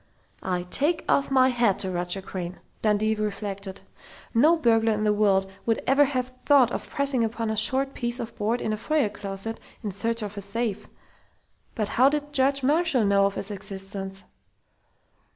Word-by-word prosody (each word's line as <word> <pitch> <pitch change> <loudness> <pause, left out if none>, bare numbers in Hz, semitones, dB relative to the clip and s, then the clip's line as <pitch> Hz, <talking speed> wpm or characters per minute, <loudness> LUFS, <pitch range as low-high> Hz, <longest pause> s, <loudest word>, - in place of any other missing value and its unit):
"I 180 -1 -2
take 290 - +1
off 280 - +2
my 260 -1 +4
hat 235 -6 +2
to 190 - -1
Roger 175 +2 -2
Crain!" 180 -1 -6 0.2
Dundee 215 0 +2
reflected. 200 -2 -4 0.5
"No 305 +9 +5
burglar 225 -5 +3
in 210 0 -2
the 210 -1 +3
world 195 -2 +2 0.2
would 225 - +1
ever 275 +2 +5
have 255 -2 -1
thought 255 0 +3
of - - -5
pressing 275 -4 0
upon 225 0 -2
a - - -1
short 265 +5 +1
piece 240 +1 -3
of 230 -1 -6
board 225 +3 -1
in 215 - -1
a - - -2
foyer 290 0 +1
closet, 200 +2 -4 0.2
in 210 - -3
search 230 +3 -2
of 205 0 -6
a - - -3
safe.... 210 +1 -3 0.9
But 215 -2 -1
how 255 +5 +4
did 290 0 -3
Judge 275 0 +3
Marshall 295 -4 +2
know 200 0 +4
of 200 - -5
its 200 - -3
existence?" 195 -1 -6
220 Hz, 175 wpm, -25 LUFS, 200-255 Hz, 0.9 s, No